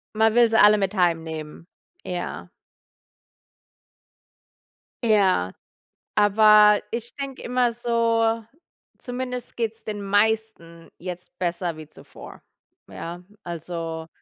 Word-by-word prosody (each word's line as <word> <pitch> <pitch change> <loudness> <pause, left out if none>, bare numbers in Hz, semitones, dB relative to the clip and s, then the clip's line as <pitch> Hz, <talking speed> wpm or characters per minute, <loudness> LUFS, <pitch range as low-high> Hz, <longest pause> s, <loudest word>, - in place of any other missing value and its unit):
Man 220 0 +3
will 240 0 +5
sie 225 - +2
alle 210 +1 +7
mit 195 0 -1
heimnehmen, 165 -2 -2 0.4
ja. 180 -1 -5 2.5
Ja. 190 - +3 0.6
Aber 210 0 +6
ich 235 +1 -5
denke 275 -2 -6
immer 245 -1 +1
so: 230 -1 +1 0.5
„Zumindest 250 -1 -6
geht's 225 -1 -3
den 210 -1 -5
meisten 205 -5 -1
jetzt 180 0 -8
besser 175 -2 -2
wie 155 -1 -10
zuvor”, - - -13 0.5
ja. 175 +2 -8 0.2
Also, 165 -1 -5
205 Hz, 95 wpm, -24 LUFS, 170-225 Hz, 2.5 s, alle